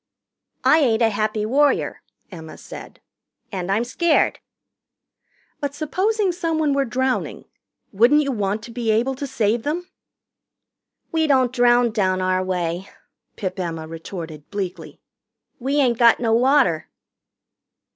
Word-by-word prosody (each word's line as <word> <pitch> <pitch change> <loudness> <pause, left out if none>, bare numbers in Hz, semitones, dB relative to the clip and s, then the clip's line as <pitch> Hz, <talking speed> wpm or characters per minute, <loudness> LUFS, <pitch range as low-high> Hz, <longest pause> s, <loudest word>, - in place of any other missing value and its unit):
"I 315 - +5
ain't 235 -5 +2
a 225 - +4
Happy 215 0 -1
Warrior," 285 +6 +1 0.3
Emma 160 -3 -10
said. - - -11 0.5
"And 190 -2 -3
I'm 215 +4 +2
scared." 315 +7 +1 1.2
"But 285 -1 -4
supposing 380 +7 0
someone 325 -4 0
were 275 0 +1
drowning, 260 +1 -2 0.5
wouldn't 245 +9 +4
you 280 - -1
want 210 -2 -2
to 235 - -9
be 235 -1 -3
able 230 +5 +2
to 275 +2 -5
save 230 -3 0
them?" 330 +7 -3 1.2
"We 320 -1 +1
don't 260 -3 +3
drown 245 -1 +4
down 190 -4 0
our 185 0 +1
way," 180 0 -3 0.5
Pip 185 -1 -4
Emma 165 -3 -4
retorted 160 -2 -8
bleakly. 195 -3 -6 0.6
"We 270 +3 -1
ain't 255 -5 +2
got 235 -1 +6
no 230 -2 +1
water." 245 - +3
235 Hz, 130 wpm, -22 LUFS, 195-280 Hz, 1.2 s, got